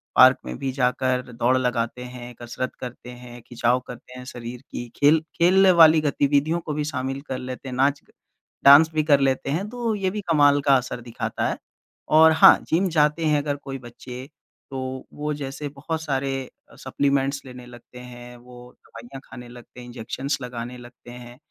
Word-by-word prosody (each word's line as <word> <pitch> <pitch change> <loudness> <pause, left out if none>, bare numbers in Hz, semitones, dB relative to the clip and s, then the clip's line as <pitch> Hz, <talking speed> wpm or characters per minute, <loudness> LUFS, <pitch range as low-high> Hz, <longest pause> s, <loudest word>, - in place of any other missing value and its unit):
Park - - +7
में 60 0 -6
भी 135 - -2
जाकर 130 -1 0
दौड़ 125 +2 +1
लगाते 125 -1 -2
हैं, 125 -1 -9
कसरत 120 +2 -5
करते 125 0 -9
हैं, 120 -1 -11
खिंचाव 120 +1 0
करते 125 +1 -11
हैं 125 - -9
शरीर 120 0 -8
की, 120 - -5
खेल 150 +3 +4 0.2
खेलने 185 +2 +5
वाली 160 -1 +7
गतिविधियों 145 +3 +1
को 150 - -3
भी 150 0 -2
शामिल 135 -1 -4
कर 130 - -3
लेते 130 +1 -7
हैं, 125 - -6
नाच 140 +2 +2
के - - -29 0.5
डांस 150 +4 +8
भी 155 -1 +1
कर 145 -2 +4
लेते 135 0 0
हैं, 185 +7 -2
तो 235 -2 -2
ये 190 -2 -1
भी 210 +2 -5
कमाल 145 -2 +4
का 140 -1 +5
असर 125 -1 -5
दिखाता 120 -1 -4
है। - - -3 0.5
और 160 +1 +6
हाँ, 160 - +7
जिम 180 +3 +1
जाते 150 0 +1
हैं 150 -2 +2
अगर 145 -1 -2
कोई 135 -1 -8
बच्चे, 125 +1 -10 0.5
तो 130 0 -5
वो 150 0 -3
जैसे 145 +1 -6
बहुत 160 +2 -4
सारे 135 -3 -3 0.3
सप्लीमेंट्स 140 0 0
लेने 125 -1 -11
लगते 125 0 -14
हैं, 125 0 -11
वो 125 0 -14
दवाइयाँ 120 +4 -11
खाने 125 -1 -11
लगते 120 0 -14
हैं, 125 - -10
इंजेक्शंस 125 +4 -4
लगाने 125 0 -7
लगते 120 0 -14
हैं, 120 0 -12
130 Hz, 185 wpm, -23 LUFS, 125-150 Hz, 0.5 s, डांस